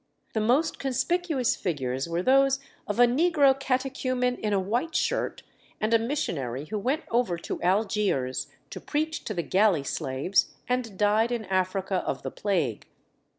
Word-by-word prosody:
The 220 - 0
most 265 +9 +2
conspicuous 280 +1 0
figures 135 -4 -2
were 170 +2 -1
those 270 +2 +4 0.3
of 205 +3 -2
a 245 - +9
negro 285 +2 +4
catechumen 255 -1 0
in 215 - -2
a 200 - +3
white 240 - -1
shirt, - - -1 0.4
and 215 +2 0
a 230 - +6
missionary 150 - -2
who 210 +6 -3
went 265 +9 -1
over 230 -7 +1
to 170 - -5
Algiers 190 -8 +1 0.2
to - - -7
preach 310 +2 -2
to 215 - -3
the 170 - -1
galley 190 -6 +3
slaves, 140 +7 0
and 245 -5 -2
died 215 +3 +3
in 235 -3 -2
Africa 190 0 0
of - - -3
the - - -4
plague. 165 - -1
215 Hz, 155 wpm, -27 LUFS, 185-255 Hz, 0.4 s, a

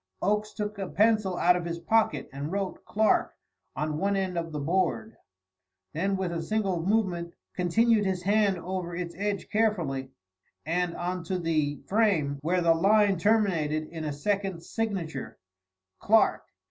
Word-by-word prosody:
Oakes 210 +2 0
took 210 -1 -4
a 190 -2 -3
pencil 210 -4 +2
out 180 +1 +4
of 180 - -2
his 170 0 -3
pocket 170 -5 +1
and 140 +3 -4
wrote 195 -1 -3
"Clark" 215 +1 +2 0.4
on 150 0 -2
one 200 +2 +1
end 190 -2 -1
of 165 -1 -3
the 150 - -4
board; 185 +8 0 0.8
then 195 +5 0
with 190 -2 -2
a 170 -1 -2
single 195 -1 -1
movement 180 -4 0 0.2
continued 215 +5 +3
his 190 -2 -1
hand 200 -1 +3
over 180 -1 -4
its 175 -1 -4
edge 200 +1 -2
carefully, 170 -12 0 0.6
and 170 +1 0
on 180 0 -3
to 185 +2 -1
the 155 -4 -1
frame, 185 -10 +1
where 175 +4 +1
the 165 -1 +5
line 200 +2 +3
terminated 170 -7 +1
in 165 -2 -6
a 150 - -2
second 190 +3 -2
signature 185 - -4 0.6
"Clark." 220 +1 +3
185 Hz, 155 wpm, -28 LUFS, 165-205 Hz, 0.8 s, the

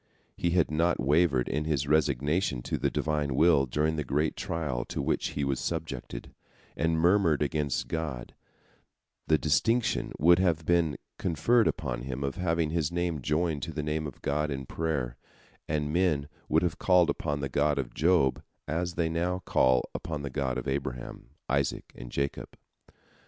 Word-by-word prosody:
Had 85 -1 +2
he - - -2
not 85 +2 +2
wavered 70 -2 +3
in 75 +2 -1
his 70 -3 0
resignation 75 -1 +1
to - - -2
the - - +1
Divine 75 -3 -1
will 70 -2 +4
during 75 +4 0
the 75 - -1
great 75 +4 0
trial 75 -7 -2
to - - -5
which - - 0
he 75 - 0
was 70 -1 0
subjected, 75 -7 -5 0.4
and 80 +1 +1
murmured 85 -3 +3
against 75 -1 -1
God, 75 -7 -4 0.9
the 80 - +4
distinction 115 - +1
would 85 +3 +5
have 85 -4 +1
been 85 -4 +2 0.2
conferred 100 - +3
upon 60 -5 -2
him 65 +2 -4
of 70 -1 -3
having 85 -3 0
his 80 -1 0
name 85 -4 -1
joined 75 +2 0
to 80 - -4
the 75 -2 -4
Name 75 0 -2
of 70 - -11
God 75 +2 0
in 65 -2 -4
prayer, 70 -6 -2 0.5
and 75 -1 -1
men 85 -5 +2 0.2
would - - +3
have 85 -3 -1
called 90 -2 +4
upon 75 -2 -3
the 70 - -1
God 75 +1 +1
of 65 -3 -3
Job 80 -5 +3 0.3
as 85 +2 -2
they 85 -1 +1
now 90 +3 -1
call 65 -1 +3
upon 75 -3 -4
the 70 - -4
God 65 -2 -1
of 65 - -4
Abraham, 65 -3 -4 0.2
Isaac, 70 0 -1
and - - -10
Jacob. 70 0 -3
75 Hz, 170 wpm, -29 LUFS, 70-85 Hz, 0.9 s, would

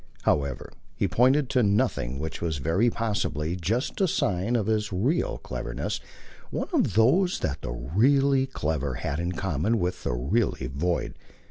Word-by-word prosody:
However, 70 -2 0 0.2
he 100 - +1
pointed 130 - +3
to 130 -2 +3
nothing; 100 - +1
which 80 +3 -5
was 80 -3 -1
very 85 - +2
possibly 100 -8 -1
just 110 - -1
a 190 - +4
sign 105 - 0
of 110 -4 +1
his 110 -1 0
real 125 - 0
cleverness, - - -4 0.5
one - - -3
of 155 - +2
those 175 - +4
that 70 0 -2
the - - -4
really 130 - +2
clever 75 - -2
had 70 +4 -3
in 85 +1 -2
common 95 +5 0
with 90 -2 -2
the - - -1
really 70 - 0
void. 75 +8 -1
95 Hz, 155 wpm, -26 LUFS, 75-120 Hz, 0.5 s, a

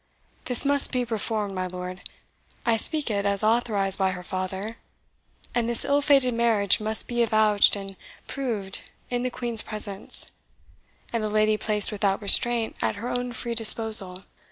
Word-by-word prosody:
This 250 +2 +3
must 280 0 +5
be 250 -1 -1
reformed, 220 -3 -3
my 185 -1 -4
lord 180 0 -8 0.6
I 230 - +2
speak 290 +3 +2
it 200 -1 -2
as 200 0 0
authorized 215 -4 0
by 190 -1 0
her 180 0 -9
father 190 +5 -6 0.8
and 235 -1 -1
this 235 - -1
ill 285 +1 +1
fated 275 -4 +2
marriage 225 -4 +2
must 215 0 +2
be 240 -1 -2
avouched 215 -3 +3
and 195 0 -9 0.3
proved 220 -8 -5 0.2
in 245 0 -2
the 255 - -2
Queen's 240 -3 0
presence, 205 -2 -2 0.8
and 230 -2 -2
the 215 - -2
lady 215 0 +1
placed 210 -1 +3
without 200 -2 -1
restraint 230 +2 +1
and - - 0
at - - -6
her 240 +3 -5
own 245 0 -4
free 240 -1 -5
disposal. 215 -4 +4
215 Hz, 165 wpm, -24 LUFS, 200-240 Hz, 0.8 s, must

